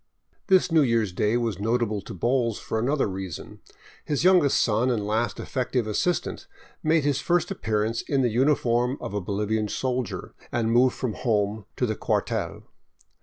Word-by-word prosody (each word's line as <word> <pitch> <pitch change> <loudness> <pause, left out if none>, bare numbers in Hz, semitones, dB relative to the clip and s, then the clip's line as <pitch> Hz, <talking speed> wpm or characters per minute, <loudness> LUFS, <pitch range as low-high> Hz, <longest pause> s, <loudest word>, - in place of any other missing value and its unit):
This 185 -3 +4
New 160 -1 +5
Year's 115 -7 +1
Day 105 +5 +1
was 115 -6 -2
notable 110 -1 0
to - - -9
Bowles 120 +2 +1
for 110 - -3
another 135 +5 +1
reason. 95 -4 -7 0.4
His 145 0 -1
youngest 180 -6 +5
son 115 +3 +2
and 110 -5 0
last 110 +2 -1
effective 125 -2 -1
assistant 155 - -1 0.3
made 155 -1 +2
his 145 -2 +1
first 175 +1 +1
appearance 110 - -1
in 135 -2 0
the 120 - +3
uniform 125 0 +2
of - - -6
a 105 - -1
Bolivian 105 +3 -1
soldier, 125 0 -3 0.2
and 115 -1 0
moved 125 +2 +4
from 125 -4 -2
home 105 -3 -1
to 125 - 0
the 110 -2 -1
cuar - - 0
tel. - - -4
120 Hz, 170 wpm, -25 LUFS, 105-135 Hz, 0.4 s, New